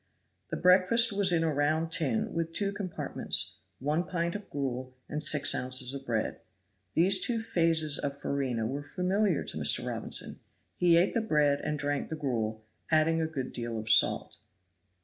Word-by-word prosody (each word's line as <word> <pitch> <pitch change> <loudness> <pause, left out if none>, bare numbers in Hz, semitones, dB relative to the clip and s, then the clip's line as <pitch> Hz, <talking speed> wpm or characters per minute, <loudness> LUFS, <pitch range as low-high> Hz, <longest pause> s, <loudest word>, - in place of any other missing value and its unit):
The - - -3
breakfast 190 +6 +4
was 200 -2 +3
in 165 -1 +2
a 160 -2 0
round 155 +3 0
tin, 150 -10 +1
with 165 0 -3
two 200 +3 0
compartments; 200 -4 -1 0.2
one 150 +5 -1
pint 170 -2 -2
of 205 -1 -8
gruel 130 -2 -4
and 150 - -4
six 150 -1 +3
ounces 130 0 0
of 135 -1 -8
bread. 110 -2 -2 0.6
These 180 +5 +3
two 235 -2 +1
phases 165 -8 +2
of 140 0 -4
farina 130 -6 -2
were 135 +5 -3
familiar 185 +4 0
to - - -6
Mr. - - +3
Robinson. - - -1 0.4
He 175 -1 +4
ate 175 +3 +2
the 230 - +1
bread 150 -8 +1
and 150 0 -2
drank 145 0 -2
the 160 - -4
gruel, 110 -7 -3 0.2
adding 160 +1 +3
a 160 - 0
good 135 -5 -5
deal 115 -1 -3
of 110 +1 -1
salt. 115 - +3
155 Hz, 170 wpm, -29 LUFS, 135-180 Hz, 0.6 s, breakfast